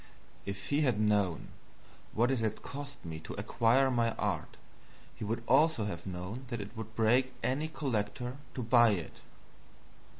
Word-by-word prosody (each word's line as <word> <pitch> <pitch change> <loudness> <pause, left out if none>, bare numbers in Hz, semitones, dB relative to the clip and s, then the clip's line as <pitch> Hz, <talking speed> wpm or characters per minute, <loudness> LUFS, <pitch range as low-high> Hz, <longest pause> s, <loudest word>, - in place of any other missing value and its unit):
If 100 -1 -5
he 145 +1 +2
had 125 -8 +2
known 105 -6 +1 0.7
what 120 +4 +3
it 130 - +1
had 110 -1 -2
cost 140 -4 -7
me 80 -1 -5
to - - -8
acquire 125 +3 +3
my 115 -2 +2
art, - - -2 0.6
he - - -7
would 115 +2 -2
also 155 -8 +4
have 85 -3 -5
known 95 +8 -5
that 120 -2 -4
it 100 0 -7
would 110 0 -7
break 125 +3 +3
any 145 +5 0
collector 125 -4 -2 0.2
to 125 - -2
buy 120 -1 +6
it. 85 -5 -5
115 Hz, 160 wpm, -32 LUFS, 105-130 Hz, 0.7 s, buy